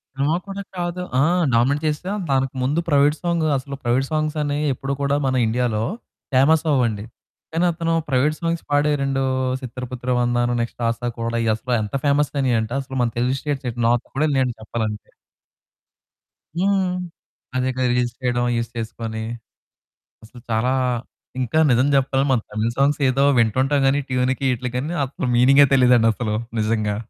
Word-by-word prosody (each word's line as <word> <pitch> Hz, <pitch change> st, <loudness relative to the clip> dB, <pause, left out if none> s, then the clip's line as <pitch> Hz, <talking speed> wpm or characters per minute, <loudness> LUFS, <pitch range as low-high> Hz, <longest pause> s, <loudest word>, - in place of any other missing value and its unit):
Cinema 145 Hz, +4 st, +1 dB
కూడా 200 Hz, 0 st, -5 dB, 0.2 s
కాదు. 175 Hz, +1 st, -3 dB, 0.2 s
ఆ! -, -, +5 dB, 0.3 s
డామినేట్ 135 Hz, +6 st, +2 dB
చేస్తే 155 Hz, +5 st, -2 dB, 0.2 s
దానికి 135 Hz, 0 st, 0 dB
ముందు 145 Hz, +6 st, +1 dB
ప్రైవేట్ 145 Hz, +1 st, +4 dB
సాంగ్ 170 Hz, -2 st, 0 dB
అసలు 140 Hz, +1 st, -6 dB
ప్రైవేట్ 130 Hz, +3 st, +1 dB
సాంగ్స్ 155 Hz, 0 st, -1 dB
అనేవి 145 Hz, +1 st, -1 dB
ఎప్పుడు 135 Hz, +2 st, -4 dB
కూడా 140 Hz, 0 st, +1 dB
మన 130 Hz, -1 st, +1 dB
ఇండియాలో 110 Hz, -1 st, 0 dB, 0.5 s
ఫేమస్ 145 Hz, +5 st, +4 dB
అవ్వవండి. 115 Hz, -6 st, +1 dB, 0.5 s
కానీ 170 Hz, +2 st, +2 dB
అతను 165 Hz, 0 st, -1 dB, 0.2 s
ప్రైవేట్ 140 Hz, +4 st, +2 dB
సాంగ్స్ 170 Hz, -1 st, -2 dB
పాడే 145 Hz, +1 st, +2 dB
2 135 Hz, -1 st, 0 dB, 0.4 s
'చిత్తర 125 Hz, 0 st, -7 dB
పట్టరా 125 Hz, 0 st, -2 dB
వందన,' 120 Hz, 0 st, +1 dB
నెక్స్ట్ 115 Hz, +1 st, -5 dB
'ఆశా 115 Hz, +1 st, -2 dB
కూడా' 115 Hz, 0 st, -1 dB, 0.2 s
అసలు 125 Hz, +2 st, -4 dB
ఎంత 105 Hz, +5 st, -4 dB
ఫేమస్ 145 Hz, 0 st, +2 dB
అయినీయంటే 120 Hz, -3 st, 0 dB
అసలు 135 Hz, 0 st, -7 dB
మన 120 Hz, -, +2 dB
తెలుగు 125 Hz, +2 st, +1 dB
స్టేట్స్‌లో 125 Hz, -5 st, -1 dB, 0.2 s
కూడా 155 Hz, +3 st, +2 dB
నేను 130 Hz, -2 st, +2 dB
చెప్పాలంటే. 110 Hz, -1 st, -4 dB, 1.4 s
హ్మ్. 195 Hz, +1 st, +2 dB, 0.7 s
అదే 130 Hz, 0 st, +1 dB
కదా. 130 Hz, 0 st, 0 dB
రిజిస్టర్ 120 Hz, 0 st, -1 dB
చేయడం 120 Hz, -1 st, +1 dB
యూజ్ 115 Hz, 0 st, -2 dB
చేసుకొని 110 Hz, 0 st, -5 dB, 1.0 s
అసలు 120 Hz, +2 st, -14 dB
చాలా. 115 Hz, +3 st, +1 dB, 0.7 s
ఇంకా 125 Hz, +5 st, 0 dB
నిజం 125 Hz, +2 st, +4 dB
చెప్పాలి. 135 Hz, 0 st, +1 dB
మన 125 Hz, -4 st, +3 dB
తమిళ్ 110 Hz, +2 st, -1 dB
సాంగ్స్ 140 Hz, +2 st, +2 dB
ఏదో 135 Hz, +2 st, +2 dB
వింటుంటాం 130 Hz, +5 st, +2 dB
గాని 140 Hz, +2 st, +3 dB
ట్యూన్‌కి 130 Hz, +2 st, 0 dB
వీటికి 125 Hz, +2 st, -3 dB, 0.2 s
అసలు 130 Hz, 0 st, -4 dB
మీనింగే 135 Hz, +3 st, +6 dB
తెలియదండి 125 Hz, -3 st, +5 dB
అసలు 110 Hz, -2 st, -2 dB, 0.3 s
నిజంగా. 105 Hz, -1 st, 0 dB
130 Hz, 150 wpm, -21 LUFS, 120-145 Hz, 1.4 s, మీనింగే